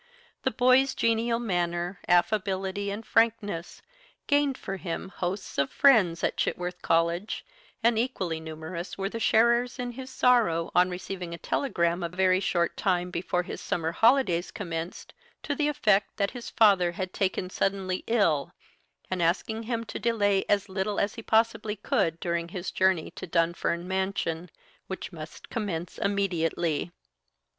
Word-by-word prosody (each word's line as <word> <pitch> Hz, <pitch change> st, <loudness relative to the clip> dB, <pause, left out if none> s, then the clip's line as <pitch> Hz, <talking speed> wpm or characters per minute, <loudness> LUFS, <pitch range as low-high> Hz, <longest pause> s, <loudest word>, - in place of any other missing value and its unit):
The -, -, +1 dB
boy's 255 Hz, +2 st, +4 dB
genial 230 Hz, +1 st, +1 dB
manner, 175 Hz, -4 st, -1 dB
affability, 190 Hz, +2 st, +1 dB
and 210 Hz, +3 st, -5 dB
frankness, 210 Hz, -7 st, 0 dB, 0.4 s
gained 285 Hz, -2 st, +2 dB
for 195 Hz, -, -5 dB
him 185 Hz, +1 st, -5 dB
hosts 185 Hz, -2 st, -4 dB
of 140 Hz, 0 st, +2 dB
friends 215 Hz, -12 st, +4 dB
at -, -, 0 dB
Chitworth 180 Hz, 0 st, -2 dB
College, 170 Hz, +5 st, 0 dB, 0.4 s
and 230 Hz, -1 st, +4 dB
equally 190 Hz, -10 st, -1 dB
numerous 160 Hz, +3 st, -6 dB
were 195 Hz, 0 st, -2 dB
the 230 Hz, -, -5 dB
sharers 235 Hz, +3 st, +3 dB
in 245 Hz, -1 st, -3 dB
his 260 Hz, +2 st, -8 dB
sorrow 230 Hz, -11 st, +3 dB
on 180 Hz, +1 st, +4 dB
receiving 180 Hz, -1 st, -5 dB
a -, -, -10 dB
telegram 170 Hz, -7 st, 0 dB
a 170 Hz, -, -2 dB
very 185 Hz, +1 st, +3 dB
short 170 Hz, -3 st, 0 dB
time 180 Hz, -2 st, 0 dB
before 180 Hz, +1 st, -1 dB
his -, -, -7 dB
summer 165 Hz, -1 st, -1 dB
holidays 225 Hz, -5 st, +3 dB
commenced 170 Hz, -3 st, -6 dB, 0.3 s
to 290 Hz, -, -1 dB
the 295 Hz, +1 st, 0 dB
effect 210 Hz, -9 st, +2 dB
that 200 Hz, -1 st, 0 dB
his 245 Hz, -2 st, -7 dB
father 195 Hz, -6 st, +4 dB
had 185 Hz, +1 st, -4 dB
taken 185 Hz, -1 st, -1 dB
suddenly 190 Hz, -1 st, -1 dB
ill, 170 Hz, -11 st, +2 dB, 0.6 s
and 185 Hz, -1 st, -1 dB
asking 195 Hz, +6 st, 0 dB
him 230 Hz, -2 st, -1 dB
to 225 Hz, -, -6 dB
delay 205 Hz, -4 st, +2 dB
as 200 Hz, -1 st, +2 dB
little 190 Hz, +2 st, -2 dB
as 200 Hz, 0 st, 0 dB
he 230 Hz, -, -7 dB
possibly 220 Hz, -1 st, +1 dB
could 165 Hz, -5 st, 0 dB
during 170 Hz, -1 st, -1 dB
his 180 Hz, +1 st, -5 dB
journey 185 Hz, -3 st, +2 dB
to -, -, -8 dB
Dunfern 170 Hz, +1 st, 0 dB
Mansion, 190 Hz, -3 st, -2 dB, 0.4 s
which 190 Hz, -, -6 dB
must 155 Hz, -1 st, -10 dB
commence 180 Hz, -7 st, -3 dB
immediately. 175 Hz, -5 st, 0 dB
190 Hz, 150 wpm, -27 LUFS, 170-220 Hz, 0.6 s, boy's